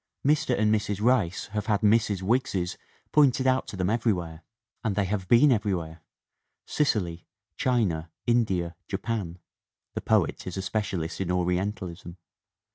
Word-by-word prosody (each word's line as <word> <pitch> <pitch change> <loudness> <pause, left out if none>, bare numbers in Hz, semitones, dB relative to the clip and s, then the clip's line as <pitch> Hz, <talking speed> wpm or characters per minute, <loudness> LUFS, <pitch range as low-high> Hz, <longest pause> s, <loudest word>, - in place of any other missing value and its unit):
Mr. 150 -3 +2
and 105 0 +3
Mrs. 105 -2 -1
Rice 110 -6 +2
have 105 -1 -3
had 105 -3 +1
Mrs. 105 -3 +2
Wiggses 95 -5 0 0.4
pointed 135 -3 +4
out 130 0 +2
to - - -7
them 90 +2 0
everywhere 90 -9 -1 0.4
and 110 -3 0
they 100 - +1
have 95 -1 -2
been 130 +7 +6
everywhere 90 -8 -1 0.6
Sicily, 95 - -1 0.3
China, 95 -11 0 0.2
India, 95 -8 +1
Japan 100 -4 -3 0.6
(the - - -3
poet - - +1
is 90 - -5
a 95 - -2
specialist 95 -4 -2
in 90 - -2
Ori 90 0 +1
entalism). 90 -3 -5
100 Hz, 140 wpm, -27 LUFS, 90-115 Hz, 0.6 s, been